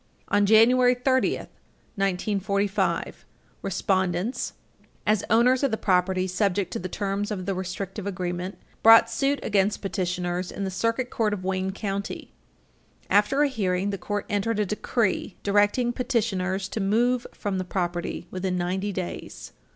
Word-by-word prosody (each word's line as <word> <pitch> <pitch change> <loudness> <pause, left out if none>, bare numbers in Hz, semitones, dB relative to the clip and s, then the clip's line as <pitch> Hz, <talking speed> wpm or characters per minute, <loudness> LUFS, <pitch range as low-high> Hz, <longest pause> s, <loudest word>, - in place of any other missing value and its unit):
On 205 0 +3
January 245 +4 +6
30, 260 +1 +2
1945, 200 +1 -2 0.4
respondents, 190 +3 -1 0.5
as 210 -1 +2
owners 245 +3 +4
of 250 -6 0
property 185 0 +2
subject 190 0 0
to - - -2
the 185 - -5
terms 200 +1 -2
of 190 -4 -4
the 195 - -1
restrictive 190 +2 -5
agreement, 180 0 -3 0.2
brought 225 0 +8
suit 280 +1 +1
against 200 0 +1
petitioners 180 -1 -2
in 200 - -5
the 190 - -2
Circuit 230 +6 -1
Court 215 -2 0
of 185 - -9
Wayne 190 0 -1
County. 200 0 -4 0.8
After 240 +8 +4
a - - +4
hearing, 200 -6 -1
the 195 - -4
court 205 +3 -3
entered 210 +1 0
a 210 - +2
decree 210 -1 -1
directing 205 +4 +2
petitioners 195 -6 -1
to - - -4
move 235 +5 +1
from 195 -2 -3
the - - -1
property 175 -2 -3
within 185 0 -2
ninety 190 +3 -1
days. 185 -2 -6
200 Hz, 140 wpm, -25 LUFS, 185-220 Hz, 0.8 s, brought